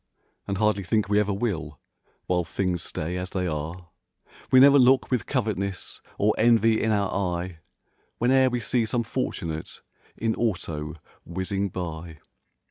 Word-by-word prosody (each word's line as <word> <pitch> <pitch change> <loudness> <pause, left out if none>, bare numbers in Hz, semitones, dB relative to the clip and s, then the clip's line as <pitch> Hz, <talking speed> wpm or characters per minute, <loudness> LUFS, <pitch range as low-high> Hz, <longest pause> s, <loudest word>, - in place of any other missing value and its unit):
And 100 - -2
hardly 105 -1 +1
think 105 +4 +1
we 105 0 +4
ever 105 -1 +1
will, 90 - -3 0.5
while 90 -1 +1
things 90 +1 -2
stay 85 +4 -3
as 90 0 -4
they 90 -1 -2
are. 85 +2 -4 0.6
We 130 - +7
never 140 +1 +8
look 130 +1 +4
with 125 -3 0
covet'ness 100 -7 -2 0.2
or 105 +1 +3
envy 115 -1 +4
in 110 - +1
our 100 -2 +1
eye 90 -3 -2 0.6
Whene'er 130 +2 +4
we 125 -1 -2
see 115 +1 +1
some 120 +1 0
fortunate 80 -6 -4 0.3
in 115 0 0
auto 80 -9 -2 0.3
whizzing 95 +3 -2
by. 85 -2 -6
100 Hz, 145 wpm, -26 LUFS, 85-115 Hz, 0.6 s, never